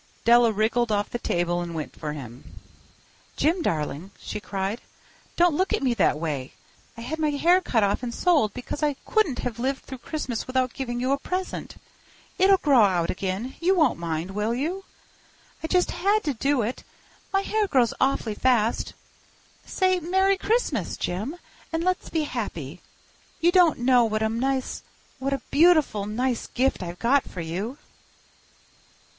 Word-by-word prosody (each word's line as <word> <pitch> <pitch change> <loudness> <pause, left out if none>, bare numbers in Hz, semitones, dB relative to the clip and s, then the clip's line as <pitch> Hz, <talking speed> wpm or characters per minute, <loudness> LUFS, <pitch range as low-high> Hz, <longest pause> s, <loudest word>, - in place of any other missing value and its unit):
Della 235 0 +6
wriggled 220 +2 +1
off 205 0 0
the 240 - -3
table 175 -3 0
and 170 -1 -5
went 155 -2 -5
for 150 -2 -5
him. 125 -4 -10 0.8
"Jim, 335 +4 +2
darling," 155 - -2
she - - -5
cried, 195 +2 -3 0.5
"don't 345 -1 +4
look 375 +6 0
at - - 0
me 255 -3 +2
that 230 - +2
way. 150 -5 -4 0.4
I - - -7
had 295 +7 -4
my 310 -1 +2
hair 340 +6 +3
cut 230 - +1
off 200 +2 +1
and 245 -2 -3
sold 300 - +2
because 250 +4 -5
I 295 -2 +1
couldn't 360 - +1
have 240 -2 -4
lived 265 +2 -1
through 260 -2 -8
Christmas 255 -5 -4
without 255 -1 0
giving 240 -3 -4
you 255 +2 0
a 280 - +1
present. 370 +5 -4 0.6
It'll 385 +1 +6
grow 280 -8 +4
out 180 -5 +2
again—you 235 - -1
won't 310 - +3
mind, 165 +1 -3
will 210 +4 -1
you? 350 +9 -3 0.8
I 320 - -3
just 360 +1 +2
had 410 +3 +1
to 290 - -1
do 275 +1 +1
it. 235 +4 -4 0.5
My 390 - +2
hair 425 +1 0
grows 255 -9 +2
awfully 260 -4 +1
fast. 235 0 +1 0.7
Say 370 -1 +1
'Merry 380 +3 +2
Christmas!' 460 +5 0
Jim, 210 - -3 0.4
and 325 0 -1
let's 370 +1 -1
be 320 -2 0
happy. 180 - -5 0.6
You 345 +1 +4
don't 355 -3 +5
know 245 -1 +4
what 215 0 -1
a 220 - +1
nice—what 265 +2 -3
a 270 -2 -3
beautiful, 305 - +4
nice 245 +3 -1
gift 260 -2 0
I've 175 -1 -6
got 260 +6 +3
for 180 - -6
you." 190 - -4
250 Hz, 165 wpm, -25 LUFS, 210-315 Hz, 0.8 s, Della